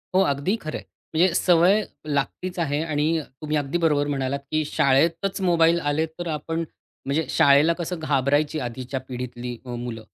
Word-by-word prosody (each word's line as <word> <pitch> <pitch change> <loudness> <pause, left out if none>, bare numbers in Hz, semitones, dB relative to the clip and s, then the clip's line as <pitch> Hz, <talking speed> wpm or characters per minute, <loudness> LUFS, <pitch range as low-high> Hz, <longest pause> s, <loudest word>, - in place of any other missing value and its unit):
हो, 190 - +6
अगदी 145 +5 0
खरं 155 - -4
आहे. - - -11 0.3
म्हणजे 175 +2 +4
सवय 180 +4 +4 0.2
लागतीच 150 +5 -2
आहे 150 -3 0
आणि 155 +1 0 0.2
तुम्ही 155 0 -1
अगदी 145 +3 -1
बरोबर 145 -3 +2
म्हणालात, 140 -1 -1
की 155 0 +1
शाळेतच 160 +7 +1
मोबाईल 170 -2 +4
आले 145 0 0
तर 160 +2 -8
आपण 160 +1 -3 0.5
म्हणजे 150 +4 0
शाळेला 145 +4 +5
कसं 175 0 -4
घाबरायची 145 +1 +1
आधीच्या 130 +1 -4
पिढीतली 125 -1 -6
अ, - - -10
मुलं 120 -2 -6
150 Hz, 160 wpm, -24 LUFS, 140-165 Hz, 0.5 s, हो